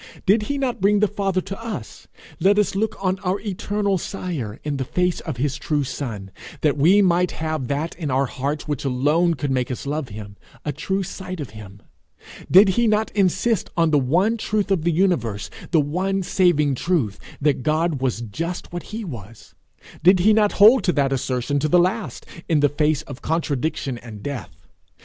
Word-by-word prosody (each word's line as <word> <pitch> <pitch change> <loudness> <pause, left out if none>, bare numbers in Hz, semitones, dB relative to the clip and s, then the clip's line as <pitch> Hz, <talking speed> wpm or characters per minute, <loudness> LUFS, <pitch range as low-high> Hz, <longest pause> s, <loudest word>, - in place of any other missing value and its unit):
Did 205 +3 +4
he 285 - 0
not 260 -7 -2
bring 205 +1 +4
the 210 - +4
Father 195 -2 -1
to 195 +4 -7
us, 210 - -7 0.3
let 195 +4 +4
us 210 - +2
look 215 +2 -1
on 185 0 +1
our 190 0 -1
eternal 200 -1 -1
Sire 155 - -5
in 145 -2 -2
the 135 - -1
face 180 +6 0
of 155 -7 -5
his 140 +2 -1
true 145 0 -1
son, 110 -8 -5 0.3
that 150 -2 +2
we 180 +8 +5
might 180 -1 +3
have 155 -5 -3
that 145 +5 -2
in 155 -4 -3
our 135 +1 +2
hearts 140 +4 -3
which 145 -3 -2
alone 150 +6 +2
could 140 0 -2
make 125 -2 0
us 125 - -5
love 145 -1 -3
him 100 -1 -9 0.3
a 150 - 0
true 195 +5 -2
sight 185 -1 -7
of 140 -7 -6
him? 105 -2 -12 0.7
Did 195 +2 +7
he 235 +5 +2
not 215 0 +1
insist 205 +2 +1
on 165 -2 +3
the 150 - +4
one 180 - +2
truth 210 -2 -1
of 170 -5 +1
the 170 - +3
universe, 150 - 0 0.2
the 165 - +3
one 185 +6 0
saving 170 -6 +2
truth, 135 - -1 0.2
that 145 -2 +1
God 155 0 0
was 125 -3 -1
just 165 - -5
what 175 - -3
he 220 +1 -5
was? 115 - -10 0.5
Did 185 +2 +5
he 215 +4 +5
not 210 -1 +3
hold 220 +6 +7
to 180 - +2
that 140 -2 +1
assertion 130 +2 -1
to 155 - 0
the 180 - +4
last, 185 +4 0 0.2
in 155 -3 +3
the 145 - +4
face 150 0 +1
of 140 -1 -10
contradiction 150 -5 -2
and 110 -4 -10
death? 140 -7 -5
160 Hz, 195 wpm, -22 LUFS, 135-195 Hz, 0.7 s, Did